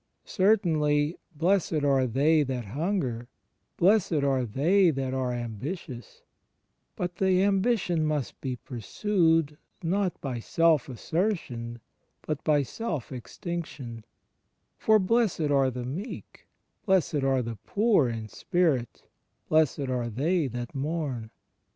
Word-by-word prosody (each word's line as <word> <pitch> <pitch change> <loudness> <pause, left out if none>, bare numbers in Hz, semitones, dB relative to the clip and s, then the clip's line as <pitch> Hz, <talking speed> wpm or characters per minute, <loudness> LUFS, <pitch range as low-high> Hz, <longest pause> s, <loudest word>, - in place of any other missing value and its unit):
Certainly 160 -7 +2 0.2
"blessed 165 -2 +1
are 135 -2 +3
they 150 +6 +3
that 130 -4 -2
hunger"; 130 - -2 0.5
blessed 180 -5 +3
are 135 -2 +2
they 170 - +3
that 135 -3 -2
are 130 -1 -1
"ambitious"; 120 - -6 0.7
but 175 -1 -4
the 190 -1 +3
ambition 195 -4 +2
must 150 -4 -2
be 130 -2 -2
pursued 160 - 0 0.2
not 185 +2 0
by 130 -4 -4
self 160 +2 +2
assertion 125 - -2 0.4
but 155 -2 -3
by 145 -2 +3
self 160 - -4
extinction; 130 -3 -6 0.7
for 220 0 +4
"blessed 195 -7 +1
are 135 -2 +4
the 125 -1 -5
meek"; 175 - -7 0.4
"blessed 175 -7 +2
are 135 -2 +2
the 115 -1 -5
poor 200 - +3
in 115 -2 -5
spirit"; 145 -3 0 0.5
"blessed 155 -2 +3
are 125 -2 -1
they 150 - +1
that 120 -1 -6
mourn." 140 -5 -3
150 Hz, 115 wpm, -27 LUFS, 125-180 Hz, 0.7 s, for